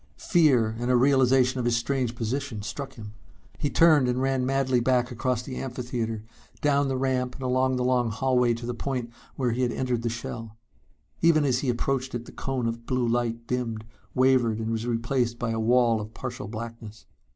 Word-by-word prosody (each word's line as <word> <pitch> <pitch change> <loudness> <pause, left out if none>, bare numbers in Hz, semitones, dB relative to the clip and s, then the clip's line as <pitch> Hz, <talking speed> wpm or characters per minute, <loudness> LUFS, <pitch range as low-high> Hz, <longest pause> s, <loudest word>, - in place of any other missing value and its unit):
Fear 125 -10 +3
and 120 +1 -2
a 125 - +4
realization 130 0 +4
of 120 - -1
his 120 -1 +2
strange 125 -1 -1
position 120 -1 -3
struck 135 +6 -5
him. 105 -3 -9 0.5
He 145 - 0
turned 155 -6 +5
and 125 +1 0
ran 135 -1 0
madly 135 -2 +2
back 125 0 +1
across 125 0 -1
the 130 0 -6
amphitheater, 120 -4 -4 0.4
down 145 -1 +2
the 135 -1 -1
ramp 130 -1 -1
and 135 - -8
along 130 +1 +1
the 125 - 0
long 125 -2 +2
hallway 125 +1 +2
to 120 +1 -7
the 120 - -2
point 125 -1 -3 0.2
where 125 -3 0
he 120 +3 -1
had 125 -1 +1
entered 125 -2 -1
the 115 - -1
shell. 115 -1 -6 0.6
Even 160 -3 +4
as 125 -2 +2
he 135 - -1
approached 130 +1 -1
it 120 0 -4
the - - -11
cone 130 -3 -3
of 115 0 -4
blue 125 -2 0
light 115 0 -1
dimmed, 115 -3 -3 0.3
wavered 130 -4 +3
and 115 0 -3
was 115 +1 -2
replaced 120 0 0
by 120 -1 -2
a 115 - -1
wall 115 0 +3
of 105 +1 -9
partial 125 -1 -6
blackness. 110 0 -8
125 Hz, 195 wpm, -26 LUFS, 115-130 Hz, 0.6 s, turned